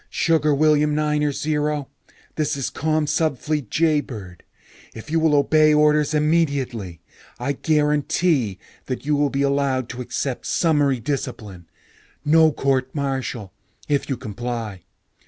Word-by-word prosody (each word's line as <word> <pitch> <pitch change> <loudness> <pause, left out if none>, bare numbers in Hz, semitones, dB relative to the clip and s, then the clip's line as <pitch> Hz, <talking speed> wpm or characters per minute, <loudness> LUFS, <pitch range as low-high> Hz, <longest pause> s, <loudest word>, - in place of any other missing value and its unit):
"Sugar 160 -2 +2
William 150 0 +3
Niner 150 -1 +1
Zero, 150 -1 -1 0.5
this 150 -2 -1
is 135 - -3
Commsubfleet 155 -3 -1
Jaybird. 130 - -1 0.5
If 115 +7 -9
you 165 - +2
will 160 -2 +3
obey 155 +1 +4
orders 150 0 +3
immediately, 140 - 0 0.4
I 125 +3 -1
guarantee 150 - +1 0.3
that 130 +1 -4
you 150 0 +2
will 145 0 +2
be 140 0 -1
allowed 140 -3 0
to 125 0 -6
accept 125 +1 -4
summary 145 -6 +2
discipline. 110 - -5 0.6
No 160 +1 +5
court 135 -1 -1
martial 130 -8 -3 0.3
if 145 -1 0
you 135 - -1
comply. 115 -3 -5
145 Hz, 120 wpm, -22 LUFS, 125-150 Hz, 0.6 s, No